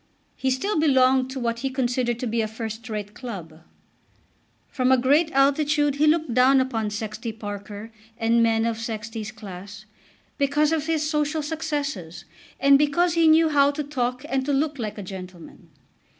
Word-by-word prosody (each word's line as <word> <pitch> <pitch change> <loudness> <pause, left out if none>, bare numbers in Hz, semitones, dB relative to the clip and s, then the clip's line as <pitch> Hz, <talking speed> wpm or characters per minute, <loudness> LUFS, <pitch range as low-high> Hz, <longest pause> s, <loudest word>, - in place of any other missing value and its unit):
He 265 - -1
still 305 +9 0
belonged 260 -3 +3
to 265 0 -5
what 235 -1 -2
he 270 +2 -2
considered 245 -2 -1
to - - -2
be 230 0 0
a 220 - -1
first 220 +1 -7
rate 210 -1 -5
club. 180 -10 -8 1.1
From 255 -1 0
a 260 - +6
great 290 +6 +3
altitude 285 +1 +2
he 305 +1 +3
looked 310 -5 +2
down 260 +2 +5
upon 230 -5 -1
Sexty 215 +2 -5
Parker 205 0 -8 0.3
and 230 0 +2
men 225 0 +2
of 230 -1 -2
Sexty's 220 -1 -5
class, 200 -1 -10 0.5
because 290 +2 +2
of 315 -1 -1
his 315 -2 0
social 300 0 -1
successes, 290 - -4 0.3
and 275 0 +6
because 325 +4 +2
he 330 -1 +4
knew 320 +1 +5
how 285 -2 +4
to 295 +1 -3
talk 250 -3 -3
and 265 0 0
to 285 +1 -1
look 285 0 0
like 215 -2 -4
a 205 - -6
gentleman. 185 -2 -10
255 Hz, 170 wpm, -24 LUFS, 220-290 Hz, 1.1 s, a